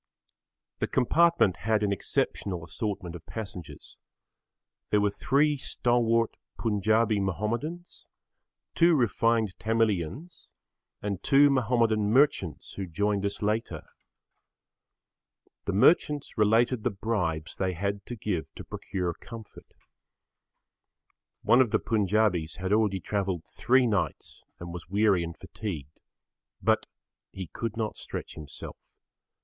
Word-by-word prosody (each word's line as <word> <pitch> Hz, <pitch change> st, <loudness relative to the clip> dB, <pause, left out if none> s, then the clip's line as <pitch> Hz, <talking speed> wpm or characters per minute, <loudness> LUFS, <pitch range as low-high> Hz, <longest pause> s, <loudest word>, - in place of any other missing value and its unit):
The -, -, 0 dB
compartment 165 Hz, -, +3 dB
had 105 Hz, +5 st, +1 dB
an 100 Hz, -, +1 dB
exceptional 90 Hz, -1 st, -1 dB
assortment 95 Hz, 0 st, -4 dB
of 85 Hz, -, -9 dB
passengers. 95 Hz, -7 st, -8 dB, 0.9 s
There 105 Hz, -, +3 dB
were 100 Hz, 0 st, +2 dB
three 145 Hz, +7 st, +2 dB
stalwart 115 Hz, -3 st, +1 dB, 0.2 s
Punjabi 110 Hz, 0 st, +2 dB
Mahomedans, 115 Hz, -, -3 dB, 0.7 s
two 170 Hz, 0 st, +5 dB
refined 115 Hz, -4 st, +2 dB
Tamilians 115 Hz, -, -1 dB, 0.5 s
and 100 Hz, -3 st, -2 dB
two 140 Hz, +1 st, +5 dB
Mahomedan 115 Hz, -5 st, +2 dB
merchants 130 Hz, -, +2 dB
who 95 Hz, -2 st, -5 dB
joined 100 Hz, +4 st, 0 dB
us 100 Hz, -, -5 dB
later. 105 Hz, -7 st, -1 dB, 1.8 s
The 100 Hz, -, -1 dB
merchants 145 Hz, -, +3 dB
related 115 Hz, +3 st, +3 dB
the -, -, +1 dB
bribes 90 Hz, -7 st, -2 dB
they 95 Hz, -1 st, 0 dB
had 100 Hz, +3 st, -2 dB
to 120 Hz, -, -5 dB
give 100 Hz, -7 st, -3 dB
to -, -, -8 dB
procure 90 Hz, -3 st, -3 dB
comfort. 115 Hz, +4 st, -12 dB, 1.7 s
One 125 Hz, -, +6 dB
of 125 Hz, -, +3 dB
the 110 Hz, -, +3 dB
Punjabis 105 Hz, -6 st, +1 dB
had 95 Hz, +2 st, -1 dB
already 105 Hz, -3 st, +2 dB
travelled 95 Hz, -3 st, -2 dB
three 125 Hz, +3 st, +2 dB
nights 100 Hz, -, -2 dB, 0.2 s
and 85 Hz, 0 st, -7 dB
was 90 Hz, -, -8 dB
weary 100 Hz, -2 st, +3 dB
and 85 Hz, 0 st, -6 dB
fatigued. 95 Hz, -8 st, -7 dB, 0.6 s
But -, -, +2 dB, 0.4 s
he 95 Hz, -, -6 dB
could 115 Hz, +6 st, -5 dB
not 110 Hz, -2 st, -2 dB
stretch -, -, -6 dB
himself. 75 Hz, -3 st, -9 dB
105 Hz, 115 wpm, -28 LUFS, 95-115 Hz, 1.8 s, One